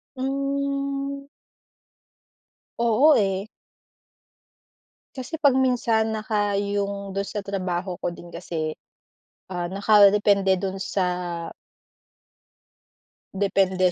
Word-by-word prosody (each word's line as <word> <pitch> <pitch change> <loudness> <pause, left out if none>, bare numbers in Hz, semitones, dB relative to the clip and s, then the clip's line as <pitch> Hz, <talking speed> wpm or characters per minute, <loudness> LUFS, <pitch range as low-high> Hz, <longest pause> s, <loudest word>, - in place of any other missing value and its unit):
Hmm. 275 +1 -2 1.5
Oo, 235 +6 +5
eh. 195 -2 0 1.7
Kasi 280 +5 -6
'pag 275 -3 +5
minsan, 230 -4 +2
naka 210 -1 -1
yung 200 0 -2
dun 200 0 -2
sa 205 - -4
trabaho 185 -2 -3
ko 175 - -3
din 175 - -12
kasi, 165 -2 -4 0.7
ah, 175 -2 -3
nakadepende 200 0 +4
dun 195 0 -3
sa 190 0 -1 2.3
depende 190 -2 +2
205 Hz, 80 wpm, -24 LUFS, 190-255 Hz, 2.3 s, Oo